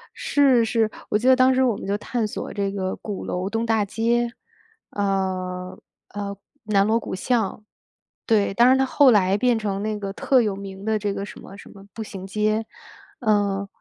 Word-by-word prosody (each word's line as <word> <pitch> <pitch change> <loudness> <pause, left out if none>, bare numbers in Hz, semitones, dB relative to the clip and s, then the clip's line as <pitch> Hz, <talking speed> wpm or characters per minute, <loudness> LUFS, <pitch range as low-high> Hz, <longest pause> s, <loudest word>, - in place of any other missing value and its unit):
是， 265 -5 +3
是。 225 -1 +1 0.2
我 210 - +2
记 245 +4 -1
得 260 - +7
当 260 0 +4
时 260 +1 +3
我 240 -5 +2
们 - - -7
就 200 +1 0
探 225 0 -2
索 - - -6
这 200 -1 -1
个 190 -1 -3
鼓 205 -3 -6
楼 185 +2 -3
东 225 +1 -1
大 220 -2 +1
街。 235 +3 0 0.6
呃， 185 -2 -2 0.4
呃， 200 -1 -4 0.3
南 200 -2 +3
锣 225 +2 +2
鼓 185 - -5
巷。 215 -1 -1 0.6
对， 210 -4 +2
但 240 +5 +5
是 260 - +5
它 265 - +2
后 270 0 +5
来 200 -2 +3
变 245 0 +2
成 200 -2 -3
那 215 -1 -2
个 195 -1 -5
特 255 +4 +2
有 210 -3 -1
名 195 0 -8
的 220 -1 +1
这 205 -1 -2
个 195 - -4
什 - - -10
么 195 - -12
什 - - -13
么 195 0 -14
步 225 - -5
行 195 -3 -8
街。 215 +2 0 0.5
嗯， 205 -3 +1
210 Hz, 215 characters per minute, -23 LUFS, 195-230 Hz, 0.6 s, 得